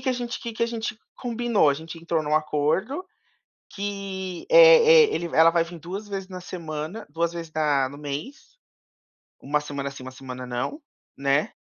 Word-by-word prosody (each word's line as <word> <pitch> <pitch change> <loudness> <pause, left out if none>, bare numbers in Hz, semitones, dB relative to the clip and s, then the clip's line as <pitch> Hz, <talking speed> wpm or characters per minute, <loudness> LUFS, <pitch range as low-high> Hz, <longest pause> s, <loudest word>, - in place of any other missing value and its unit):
que 260 - -2
a 255 - +3
gente 245 -1 -4
o - - -18
que 235 - -5
que 220 - -3
a - - +3
gente 225 -2 -4 0.2
combinou. 240 - +1
A 140 - +3
gente 165 +2 -8
entrou 165 -1 -1
num 150 0 0
acordo 155 - 0 0.7
que, 195 -2 -5
eh 485 -1 +8
eh, - - -2
ele 170 - -2
ela 165 +1 +7
vai 170 -1 +3
vir 170 0 -10
2 190 +6 -6
vezes 195 -2 -5
na 185 -1 -8
semana, 165 +3 -6
2 165 +3 -1
vezes 165 -2 -7
na 145 -4 +2
no 140 - -11
mês, 150 - -7 0.8
uma 150 +2 0
semana 140 -1 -5
sim, 140 -2 -10
uma 130 - -8
semana 130 -1 -8
não, 125 - -3 0.4
né. 140 +1 +1
170 Hz, 190 wpm, -25 LUFS, 150-220 Hz, 0.8 s, eh